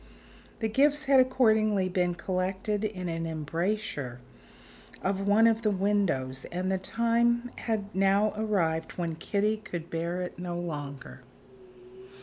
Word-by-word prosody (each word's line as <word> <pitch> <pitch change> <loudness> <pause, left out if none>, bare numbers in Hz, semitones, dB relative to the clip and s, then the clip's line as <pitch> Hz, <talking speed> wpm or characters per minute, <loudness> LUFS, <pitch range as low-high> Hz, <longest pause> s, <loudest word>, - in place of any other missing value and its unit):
The 220 - +2
gifts 290 +6 +2
had 270 -1 +6
accordingly 220 -6 +3
been 180 -1 0
collected 190 +4 -2
in 190 -4 -3
an 165 0 -2
embrasure 160 - -3 0.8
of 195 +1 -1
one 210 +3 +5
of 225 0 +3
the 215 - +2
windows; 185 -10 0
and 185 +2 -2
the 190 - 0
time 235 +3 +1
had 210 -3 -3
now 195 +3 +3
arrived 180 -7 0
when 170 -2 -2
Kitty 210 +6 0
could 175 -5 -7
bear 170 +2 -2
it 180 - -7
no 175 -1 -4
longer. 145 -7 -6
195 Hz, 135 wpm, -28 LUFS, 170-215 Hz, 0.8 s, had